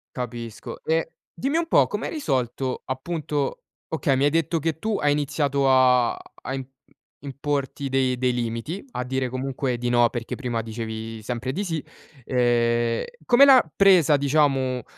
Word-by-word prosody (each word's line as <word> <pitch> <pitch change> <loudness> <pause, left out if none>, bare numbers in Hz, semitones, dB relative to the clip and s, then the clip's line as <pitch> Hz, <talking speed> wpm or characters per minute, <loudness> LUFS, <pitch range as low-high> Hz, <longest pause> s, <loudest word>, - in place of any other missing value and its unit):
Capisco 120 -3 -6
e 165 0 0 0.2
dimmi 280 +5 -1
un 335 - +1
po' - - +4
come - - -4
hai - - -4
risolto 130 - -2
appunto 145 +1 -3 0.3
okay, 140 -3 0
mi 135 - +2
hai - - +5
detto 165 +1 0
che 160 0 -2
tu 215 +4 -1
hai 145 0 +2
iniziato 145 -1 0
a 125 -2 +5
a 130 - -9
im 135 - -3 0.6
importi 140 0 -3
dei 130 -1 +1
dei 125 0 +2
limiti, 120 - -3
a 125 - -3
dire 130 0 -1
comunque 130 0 -2
di 120 0 -1
no 120 -1 +4
perché 120 -1 -5
prima 120 -4 -3
dicevi 110 0 -6
sempre 125 +2 -3
di 200 - -2
sì, 165 -6 -3 0.4
ehm, 120 -1 +1 0.2
come 260 +3 +7
l'ha 260 - +7
presa 180 -7 +5
diciamo 135 -4 +1
135 Hz, 160 wpm, -24 LUFS, 120-150 Hz, 0.6 s, come